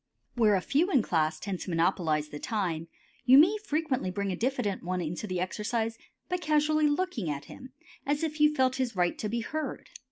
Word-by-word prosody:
Where 220 -4 +4
a 190 - +1
few 310 - +1
in 270 -9 +4
the - - -9
class 155 -2 +1
tend 195 -1 -4
to - - -6
monopolize 165 -3 +1
the 145 - -7
time 170 -7 -2 0.4
you 260 +1 +7
may 345 +8 +7
frequently 295 - -1
bring 200 +1 -2
a - - -1
diffident 225 -5 -1
one 180 +1 -2
into 175 +5 -4
the 185 -2 -2
exercise 220 +4 -2 0.3
by 360 - -1
casually 305 -2 +2
looking 290 - -1
at 140 -1 -4
him 260 0 -12 0.3
as 290 +3 -1
if 310 -1 -2
you 300 0 +5
felt 260 -1 +2
his 255 -4 -1
right 175 -1 +1
to 215 - -2
be 235 +2 -1
heard. 310 +3 -5
225 Hz, 210 wpm, -29 LUFS, 180-295 Hz, 0.4 s, you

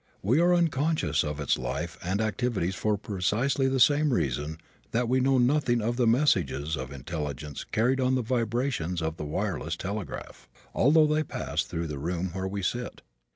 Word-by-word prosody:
We 120 +10 +3
are 175 +1 +4
unconscious 155 - +2
of 75 -1 -4
its 70 - +1
life 85 0 -3
and 95 +4 0
activities 110 -4 -1
for 105 +1 0
precisely 110 +8 0
the 135 0 +1
same 145 +3 +4
reason 75 - -1 0.3
that 120 +1 0
we 130 +2 +2
know 135 +1 +3
nothing 125 -1 +3
of 115 +2 -1
the 120 -1 +2
messages 115 - +2
of 65 -2 -6
intelligence 75 0 -5
carried 125 +4 +1
on 130 0 +2
the 130 - 0
vibrations 115 - -1
of 80 0 -2
the 75 - -5
wireless 80 0 -2
telegraph, 100 +1 -6 0.2
although 155 +4 +5
they 150 +1 +2
pass 155 - -2
through 85 0 -4
the 75 -3 -5
room 85 +4 -2
where 95 0 -3
we 100 0 -4
sit. 120 +6 -3
105 Hz, 175 wpm, -28 LUFS, 85-130 Hz, 0.3 s, although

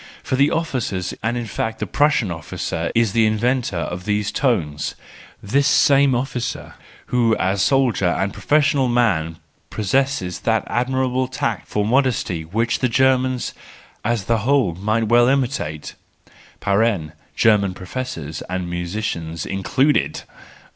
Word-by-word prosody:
For - - -1
the 140 +3 +4
officer, 130 - -1 0.2
and 115 +3 -1
in 120 - -3
fact 110 +1 -3
the 105 - -3
Prussian 135 -2 +2
officer 85 0 -4
is 115 -3 +2
the 115 -1 +4
inventor 120 -1 0
of 90 +2 -4
these 105 0 0
tones: 100 - -1 0.5
this 140 +8 +2
same 140 -2 +4
officer, 125 -1 -3 0.4
who, 115 -3 +3
as 95 +1 0
soldier 130 -8 +2
and 95 +3 0
professional 145 -3 +2
man 95 -10 +1 0.3
pos¬ 105 -3 -4
sesses 135 -10 0
that 110 -1 +1
admirable 130 +1 0
tact 120 -4 -3
for 105 -1 -1
modesty 120 -8 +1
which 115 +8 -1
the 125 - +1
Germans 130 0 +1 0.5
as 115 -5 -1
a 115 - +2
whole 125 -5 +2
might 110 +6 0
well 120 +2 +5
imitate 125 - -1 1.4
(German 105 -4 +3
professors 90 - -6
and 90 -1 -3
musicians 85 -2 -4
included 130 +10 0
!). - - -28
115 Hz, 135 wpm, -21 LUFS, 95-130 Hz, 1.4 s, well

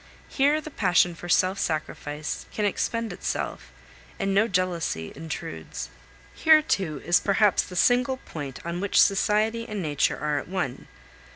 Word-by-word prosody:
Here 290 +2 +2
the 310 0 -9
passion 180 -6 +3
for 175 +1 -9
self 185 +2 +3
sacrifice 150 -1 -3
can 210 - -1
expend 230 +3 -1
itself, - - -4 0.5
and 195 -1 -1
no 210 +3 +4
jealousy 175 - -1
intrudes. 140 - -6 0.4
Here, 315 -1 +5
too, 160 - -1
is 175 - +4
perhaps 205 0 +3
the 180 - -9
single 250 +6 +3
point 145 - -8
on 170 +1 -3
which 200 - +2
society 215 +3 +2
and 210 -1 -3
nature 150 -5 0
are 150 -1 0
at - - -9
one. 180 -8 -3
185 Hz, 150 wpm, -26 LUFS, 160-220 Hz, 0.5 s, Here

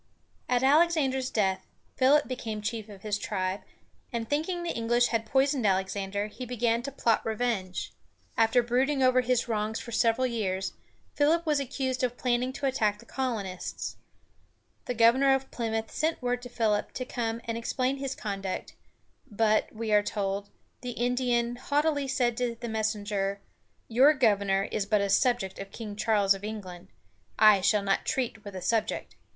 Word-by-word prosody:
At 250 0 +2
Alexander's 275 -3 +3
death, 195 -5 0 0.3
Philip 280 +3 +4
became 225 -4 -4
chief 220 0 -4
of 195 -2 -12
his 205 -1 -1
tribe; 185 0 -2 0.5
and 230 -2 -3
thinking 330 +6 -1
the 345 - -2
English 240 +1 +2
had 225 -1 -1
poisoned 270 +1 +2
Alexander, 195 +1 0
he 215 +4 -8
began 235 -1 0
to 280 - -5
plot 230 -4 +1
revenge. 220 -5 -2 0.4
After 225 +2 +4
brooding 265 +3 +1
over 255 0 +5
his 250 -1 +1
wrongs 220 -1 -1
for 235 - -8
several 230 +2 +2
years, 195 -6 -2 0.4
Philip 320 +4 +2
was 300 -2 +2
accused 260 -1 -2
of 245 0 -1
planning 250 0 0
to 280 - -4
attack 215 -6 +1
the - - -16
colonists. 215 -9 -4 0.9
The 245 - -3
governor 255 +4 +5
of 270 0 -5
Plymouth 225 -2 -2
sent 315 +1 -1
word 245 -1 -1
to 245 - -9
Philip 215 -3 0
to 255 - -4
come 230 -2 -3
and 230 - -3
explain 255 +3 -1
his 270 -1 -4
conduct, 195 -3 -4 0.6
but, 215 0 +2
we 220 0 -4
are 210 0 +6
told, 200 -1 -3 0.3
the 250 -1 -4
Indian 240 0 0
haughtily 290 +1 0
said 245 -3 +1
to 245 -2 -1
the 235 - -5
messenger: 210 -3 -1 0.5
"Your 265 +7 +5
governor 200 -6 +2
is 200 -2 -1
but 210 -1 +3
a 200 -1 0
subject 240 -7 +1
of 195 0 -6
King 215 -3 -7
Charles 205 -2 +3
of 195 0 -8
England. 190 -4 -7 0.5
I 210 -2 +7
shall 205 +1 +3
not 195 0 +1
treat 235 -5 -2
with 200 -2 -9
a 185 - -5
subject. 225 -2 -1
230 Hz, 165 wpm, -28 LUFS, 210-255 Hz, 0.9 s, I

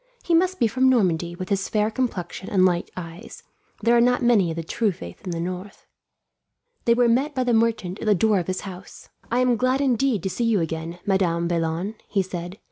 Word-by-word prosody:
He 345 - 0
must 370 +3 +2
be - - +4
from 260 +4 +3
Normandy, 175 -8 +1
with 185 +2 -6
his 195 -1 -1
fair 215 0 +1
complexion 195 -7 -3
and 185 -2 +4
light 175 -2 +1
eyes. 170 -1 -9 0.4
There 235 +2 +4
are 235 - +5
not 245 +1 +2
many 220 -7 +4
of 165 - -3
the 165 - -4
true 210 +6 0
faith 85 - -10
in - - -6
the 170 -1 -3
north." 185 +3 -6 1.0
They 235 - +4
were 245 0 +4
met 270 +6 +1
by 255 - +1
the 245 -1 +1
merchant 220 -5 +1
at - - -5
the 210 - +5
door 210 +2 +3
of 175 - -4
his 185 0 -2
house. 190 -1 -10 0.2
"I 245 +2 +1
am 250 -2 +3
glad 255 +3 +1
indeed 260 -6 +1
to 190 - -1
see 240 - -1
you 225 -3 +2
again, 165 +1 -4
Madame 175 -4 +1
Vaillant," 170 +5 -2
he 195 -2 +1
said. 180 0 -6
200 Hz, 220 wpm, -24 LUFS, 175-235 Hz, 1.0 s, are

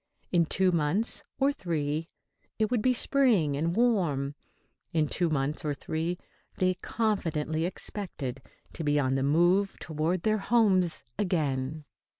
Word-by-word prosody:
In 170 -3 +3
two 185 +2 +2
months, 170 +7 +1 0.2
or 275 +1 +2
three, 160 - -2 0.5
it 220 0 0
would 240 -3 +2
be 255 - +3
spring 235 - +3
and 165 +4 -1
warm. 175 - +1 0.6
In 155 -2 +3
two 170 +3 0
months, 150 0 -1
or 150 -2 -1
three, 165 +5 -3 0.4
they 185 0 +2
confidently 165 -7 -1
expected 170 - -5 0.3
to 165 - -5
be 145 -1 +2
on 130 -2 +1
the 135 - +1
move 175 +8 +3
toward 160 +3 -2
their 215 0 +2
homes 195 -6 +2 0.2
again. 150 -6 -1
170 Hz, 140 wpm, -28 LUFS, 150-200 Hz, 0.6 s, In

